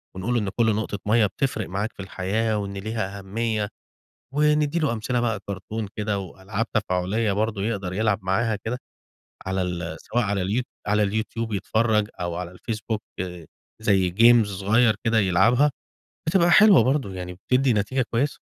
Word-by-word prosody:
ونقول 95 Hz, +6 st, -2 dB
له 120 Hz, -, +2 dB
إن 100 Hz, -, -2 dB
كل 110 Hz, +2 st, +1 dB
نقطة 105 Hz, -1 st, -3 dB
مَيَّة 110 Hz, +1 st, +4 dB
بتفرق 110 Hz, 0 st, -2 dB
معاك 100 Hz, +5 st, -2 dB
في -, -, -31 dB
الحياة 105 Hz, +4 st, -1 dB
وإن 100 Hz, -1 st, -4 dB
ليها 100 Hz, 0 st, -4 dB
أهمية، 105 Hz, +1 st, -2 dB, 0.7 s
وندِّي 150 Hz, +1 st, +2 dB
له 155 Hz, -7 st, +1 dB
أمثلة 120 Hz, +2 st, -1 dB
بقى 115 Hz, -3 st, -1 dB
كرتون 100 Hz, +2 st, -5 dB
كده 105 Hz, -1 st, -1 dB
وألعاب 100 Hz, +4 st, -4 dB
تفاعلية 105 Hz, +1 st, 0 dB
برضو 105 Hz, +1 st, -1 dB
يقدر 100 Hz, -3 st, -2 dB
يلعب 105 Hz, +1 st, +1 dB
معاها 105 Hz, +4 st, +1 dB
كده، 110 Hz, +5 st, -4 dB, 0.7 s
على 95 Hz, 0 st, 0 dB
ال 85 Hz, -2 st, -3 dB
سواء 120 Hz, +1 st, -1 dB
على 100 Hz, -1 st, 0 dB
اليو 105 Hz, +7 st, 0 dB, 0.2 s
على 105 Hz, +1 st, +2 dB
اليوتيوب 110 Hz, +2 st, -2 dB
يتفرج 105 Hz, +2 st, +1 dB
أو 85 Hz, -1 st, -2 dB
على 90 Hz, 0 st, -4 dB
الفيسبوك 110 Hz, +3 st, -4 dB, 0.8 s
زي 95 Hz, -4 st, +3 dB
جيمز 115 Hz, +1 st, +5 dB
صغيّر 110 Hz, +2 st, +3 dB
كده 115 Hz, 0 st, +3 dB
يلعبها، 110 Hz, +9 st, +4 dB, 0.6 s
بتبقى 175 Hz, +1 st, +4 dB
حلوة 215 Hz, -1 st, +7 dB
برضو 135 Hz, -3 st, +1 dB
يعني 90 Hz, -1 st, -6 dB
بتدِّي 125 Hz, +8 st, +1 dB
نتيجة 110 Hz, +6 st, 0 dB
كويّسة. 135 Hz, +5 st, 0 dB
105 Hz, 160 wpm, -24 LUFS, 95-115 Hz, 0.8 s, حلوة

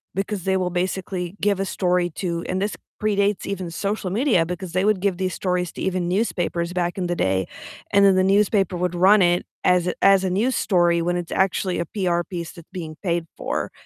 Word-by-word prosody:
because 195 Hz, -1 st, -2 dB
they 190 Hz, 0 st, +1 dB
will 180 Hz, -1 st, 0 dB
basically 180 Hz, 0 st, -3 dB
give 200 Hz, -1 st, +1 dB
a 195 Hz, -, 0 dB
story 180 Hz, -2 st, +1 dB
to 170 Hz, 0 st, -3 dB
and 185 Hz, +1 st, -1 dB
this 205 Hz, +1 st, -1 dB, 0.3 s
predates 205 Hz, -1 st, +1 dB
even 185 Hz, -4 st, -4 dB
social 200 Hz, +2 st, -2 dB
media 210 Hz, -, +2 dB
because 180 Hz, +1 st, -6 dB
they 185 Hz, +1 st, +1 dB
would 210 Hz, -1 st, +2 dB
give 195 Hz, -1 st, 0 dB
these 185 Hz, -1 st, -1 dB
stories 180 Hz, -2 st, -1 dB
to -, -, -9 dB
even 185 Hz, -2 st, -1 dB
newspapers 175 Hz, -3 st, -1 dB
back 175 Hz, 0 st, -1 dB
in 180 Hz, -2 st, -1 dB
the 175 Hz, -, -1 dB
day, 95 Hz, -, 0 dB, 0.5 s
and 200 Hz, 0 st, +6 dB
then 195 Hz, -1 st, +6 dB
the 185 Hz, -, +3 dB
newspaper 195 Hz, -1 st, +2 dB
would 180 Hz, 0 st, -1 dB
run 195 Hz, +4 st, +5 dB
it 175 Hz, 0 st, +3 dB, 0.2 s
as 180 Hz, -1 st, +3 dB
a 180 Hz, -, 0 dB
as 195 Hz, -1 st, +5 dB
a -, -, +1 dB
news 225 Hz, +8 st, +1 dB
story 175 Hz, -3 st, +2 dB
when 175 Hz, +1 st, 0 dB
it's 175 Hz, -1 st, -4 dB
actually 190 Hz, -1 st, 0 dB
a 170 Hz, -, -1 dB
PR 180 Hz, -4 st, 0 dB
piece 170 Hz, -3 st, -5 dB
that's 170 Hz, -3 st, -14 dB
being 160 Hz, -4 st, -6 dB
paid 170 Hz, -3 st, 0 dB
for. -, -, -3 dB
185 Hz, 215 wpm, -23 LUFS, 175-195 Hz, 0.5 s, and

